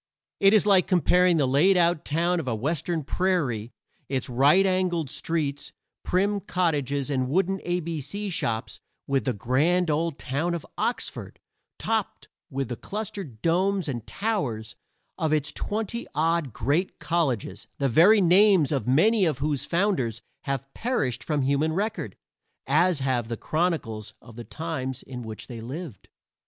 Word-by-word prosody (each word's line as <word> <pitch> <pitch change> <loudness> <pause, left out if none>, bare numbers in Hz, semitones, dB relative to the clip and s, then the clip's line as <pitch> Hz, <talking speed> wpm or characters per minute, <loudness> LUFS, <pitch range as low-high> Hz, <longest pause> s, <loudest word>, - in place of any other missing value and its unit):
It 195 +2 +6
is 210 - +4
like 195 -3 +4
comparing 180 -1 +4
the 145 - +3
laid 150 +9 +4
out 170 -2 +2
town 170 +4 +1
of 150 - -5
a 120 - 0
western 160 +6 -2
prairie, 140 - -1 0.4
its 130 -2 -2
right 145 +10 +4
angled 180 -6 0
streets, 150 -4 -2 0.3
prim 200 +3 +1
cottages, 145 -7 -1
and 130 -2 0
wooden 190 +4 +1
a 175 0 -1
b 165 -2 -4
c 200 +8 -4
shops, 115 -9 -2 0.3
with 140 -1 0
the 130 - +1
grand 155 - +1
old 160 0 -1
town 160 +7 -2
of 165 - -6
Oxford, - - -3 0.4
topped - - -2 0.2
with 135 -2 -3
the 120 - -3
clustered 195 - -6
domes 185 +2 +1
and 120 -6 -4
towers 135 - -2 0.4
of 160 -1 0
its 150 -2 +1
twenty 225 +2 -3
odd 160 -2 +1
great 145 - -1
colleges, 140 - -1
the 140 - +1
very 180 - +6
names 185 -3 +5
of 135 -4 -1
many 195 - +4
of 155 -6 0
whose 140 -1 -1
founders 170 - 0 0.2
have 135 -1 -3
perished 225 - -1
from 150 -3 0
human 140 +4 +1
record, 210 +5 -2 0.5
as 175 -5 +2
have 130 -4 0
the 115 0 -4
chronicles 155 - -2
of 115 -1 -15
the 120 - -7
times 135 -6 -4
in 125 -2 -8
which 110 -2 -7
they 120 -3 -8
lived. 135 - -8
155 Hz, 155 wpm, -26 LUFS, 130-180 Hz, 0.5 s, It